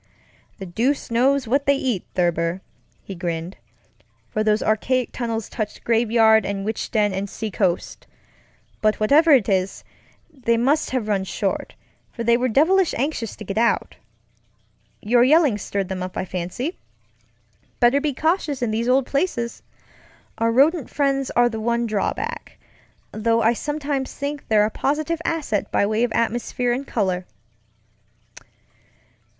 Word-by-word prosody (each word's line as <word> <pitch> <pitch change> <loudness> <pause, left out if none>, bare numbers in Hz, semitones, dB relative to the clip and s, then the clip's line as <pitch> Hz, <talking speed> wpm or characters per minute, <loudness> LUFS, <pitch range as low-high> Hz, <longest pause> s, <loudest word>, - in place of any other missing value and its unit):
"The 195 - -7
deuce 235 +10 -1
knows 260 +2 +2
what 275 +4 +1
they 280 - +5
eat, 250 -9 -2
Thurber," 175 0 0 0.4
he 195 - -7
grinned, 170 0 -4 0.7
"for 215 - 0
those 215 0 +2
archaic 240 +4 0
tunnels 230 -3 -3
touched 215 -3 -5
graveyard 225 -1 +4
and 195 0 -3
witch 220 0 -3
den 210 -3 +1
and 195 +1 -3
seacoast. 195 -5 -2 0.7
But 215 -1 +2
whatever 290 +10 +4
it 265 -9 +5
is, 190 -2 0 0.5
they 240 -6 0
must 280 +7 +1
have 255 -5 -2
run 200 -2 0
short, 190 - -3 0.4
for 235 - -5
they 235 +1 +4
were 250 +2 +1
devilish 330 - +3
anxious 245 -4 -2
to - - -9
get 200 +1 -2
out. 235 0 +1 1.1
Your 240 +3 +4
yelling 280 -5 +4
stirred 195 -1 -3
them 190 -1 -4
up, 185 0 -5
I - - -2
fancy. 185 - -4 1.0
Better 245 +4 +4
be 300 0 0
cautious 310 -5 0
in 230 - 0
these 230 +3 -1
old 260 +1 +3
placesŌĆöour 265 -5 -2 0.8
rodent 265 +7 +3
friends 275 -2 0
are 240 0 +5
the 225 -2 -4
one 235 +1 0
drawback, 215 -3 -3 0.5
though 230 +1 +1
I 225 +2 +4
sometimes 285 0 -3
think 285 0 -5
they're 210 -1 +4
a 215 - -2
positive 310 +6 -1
asset 300 -13 -2
by - - +2
way 215 +3 0
of 245 - 0
atmosphere 240 +1 0
and 270 +3 -4
color." 185 -5 -1
235 Hz, 145 wpm, -22 LUFS, 210-275 Hz, 1.1 s, they